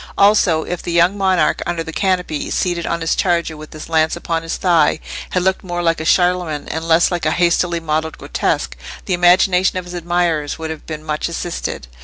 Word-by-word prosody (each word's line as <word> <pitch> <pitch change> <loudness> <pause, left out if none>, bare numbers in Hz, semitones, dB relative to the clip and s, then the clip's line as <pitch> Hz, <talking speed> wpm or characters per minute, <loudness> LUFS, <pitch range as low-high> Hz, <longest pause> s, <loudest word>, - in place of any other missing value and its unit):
Also, 200 -6 +4
if 180 -1 -4
the 175 - -4
young 170 +3 +3
monarch 190 -5 +1
under 170 -1 -2
the 160 0 -8
canopy, 180 -6 -1
seated 175 -2 -1
on 170 0 -2
his 165 - +1
charger 170 -3 0
with 155 0 -11
his 155 - -9
lance 160 -1 +2
upon 165 -1 -2
his 165 0 -4
thigh, 170 -4 +3 0.3
had 180 - 0
looked 190 0 0
more 175 -1 -3
like 165 -1 +1
a - - -5
Charlemagne 175 -4 +1
and 160 +1 -4
less 165 +2 +4
like 175 -3 -1
a - - +4
hastily 170 +1 +1
modelled 160 0 -2
grotesque, - - -2 0.3
the 185 - -1
imagination 180 +1 +4
of 180 - -4
his 180 - -9
admirers 175 -3 -1
would 160 0 -5
have 160 - -9
been 155 -1 -6
much 155 +1 -2
assisted. 170 - -4
170 Hz, 205 wpm, -18 LUFS, 160-180 Hz, 0.3 s, Also